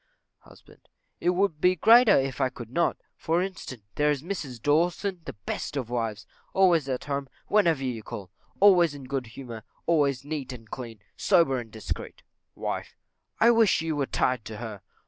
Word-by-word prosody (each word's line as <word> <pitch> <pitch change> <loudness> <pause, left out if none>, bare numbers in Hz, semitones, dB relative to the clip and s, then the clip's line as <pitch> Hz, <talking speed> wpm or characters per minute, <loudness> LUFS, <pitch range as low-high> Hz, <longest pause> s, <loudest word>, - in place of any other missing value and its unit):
Husband. - - -20 0.3
It 175 - +1
would 180 -4 +1
be 180 0 +5
still 165 - -30
greater 230 -1 +8
if 135 0 -1
I 130 - +3
could 120 -2 -10
not; 170 +6 +1 0.2
for 170 +3 0
instance, 165 - -7
there 150 0 +2
is 145 -2 0
Mrs 155 -10 -5
Dawson, 175 - +1
the - - -6
best 105 +7 -5
of 125 -3 -4
wives; 110 -4 -2 0.3
always 175 -7 +4
at 130 -1 -2
home, 140 -1 -3 0.2
whenever 170 -9 +3
you 125 -4 -3
call, 95 -3 -8 0.3
always 175 -6 +6
in 140 - -9
good 130 -1 -3
humour, 115 -1 -8 0.2
always 140 -5 +2
neat 145 -4 -4
and 115 -3 -11
clean, 115 -5 -7
sober 135 -7 +3
and 115 -2 -8
discreet. 110 -1 -6 0.3
Wife. - - -4 0.4
I 230 +2 +7
wish 225 -8 +4
you 160 -1 -1
were 140 -2 -1
tied 125 -3 0
to 110 - -7
her. 110 -3 -7
140 Hz, 180 wpm, -27 LUFS, 125-170 Hz, 0.4 s, greater